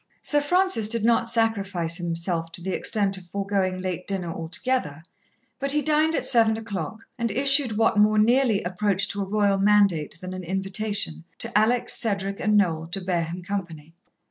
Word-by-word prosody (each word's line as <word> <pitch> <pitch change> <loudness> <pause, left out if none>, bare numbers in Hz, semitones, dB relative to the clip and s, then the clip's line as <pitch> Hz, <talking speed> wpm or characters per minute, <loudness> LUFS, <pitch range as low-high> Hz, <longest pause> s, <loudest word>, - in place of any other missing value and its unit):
Sir 295 -1 +2
Francis 360 - +2
did 225 0 0
not 230 0 +2
sacrifice 200 -7 0
himself 170 -1 -3
to 175 - -5
the 190 - -3
extent 200 -2 0
of 180 - -15
foregoing 195 -1 -1
late 185 -1 -4
dinner 180 -4 -3
altogether, 165 - -3 0.6
but 275 0 +1
he 295 0 +1
dined 310 +1 +2
at - - -1
seven 225 -2 +3
o'clock, 220 -1 -5 0.2
and 235 0 0
issued 270 0 +3
what 225 -1 +2
more 215 +1 +4
nearly 230 -1 +3
approached 195 +2 0
to 200 - -4
a - - -2
royal 200 0 +1
mandate 195 -7 +2
than 185 +1 -7
an 185 0 -6
invitation, 195 - -3
to - - -4
Alex, 225 +3 +2
Cedric 200 -3 -1
and 210 0 +2
Noel 165 -5 +1
to 180 +4 -3
bear 180 -2 -1
him 175 +2 -7
company. 170 -5 -6
200 Hz, 175 wpm, -24 LUFS, 180-225 Hz, 0.6 s, more